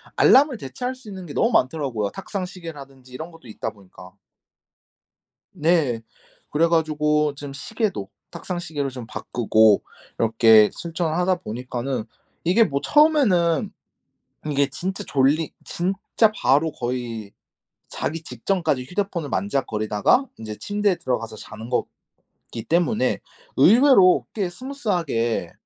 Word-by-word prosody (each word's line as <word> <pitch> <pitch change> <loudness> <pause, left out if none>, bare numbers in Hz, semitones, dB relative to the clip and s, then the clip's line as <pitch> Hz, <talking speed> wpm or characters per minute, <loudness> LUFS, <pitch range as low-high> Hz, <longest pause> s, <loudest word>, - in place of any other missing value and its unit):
알람을 270 -2 +5
대체할 245 - -5
수 255 -5 -13
있는 190 -2 -8
게 150 - -8
너무 230 - +2
많더라고요, 130 - 0
탁상시계라든지 165 -10 -8
이런 160 +6 -7
것도 165 -7 -16
있다 110 - -5
보니까. 95 -2 -15 1.4
네. 155 -8 +1 0.5
그래 160 +3 +3
가지고 150 -2 +1
좀 140 0 -8
시계도 155 - -3 0.2
탁상시계로 165 -6 -4
좀 125 -3 -8
바꾸고 110 -3 +2 0.4
이렇게 110 -1 +5
실천을 165 -1 -3
하다 180 +1 +2
보니까는 125 -1 -4 0.4
이게 190 +7 +5
뭐 140 -8 -2
처음에는 250 - +3 0.8
이게 140 -1 +2
진짜 185 +8 -4
졸리 145 +3 +2
진짜 195 +4 0
바로 150 +4 +2
거의 120 -4 -4 0.6
자기 165 +2 -4
직전까지 150 - -1
휴대폰을 180 -1 -3
만지작거리다가 110 - +1
인제 110 -1 -7
침대에 205 -2 0
들어가서 115 -3 -3
자는 110 +2 -10
거기 125 - -3 0.6
때문에 175 +7 +1 0.4
의외로 210 - +6
꽤 195 -5 -1
스무스 260 +6 -9
하게 120 - 0
155 Hz, 290 characters per minute, -23 LUFS, 125-185 Hz, 1.4 s, 의외로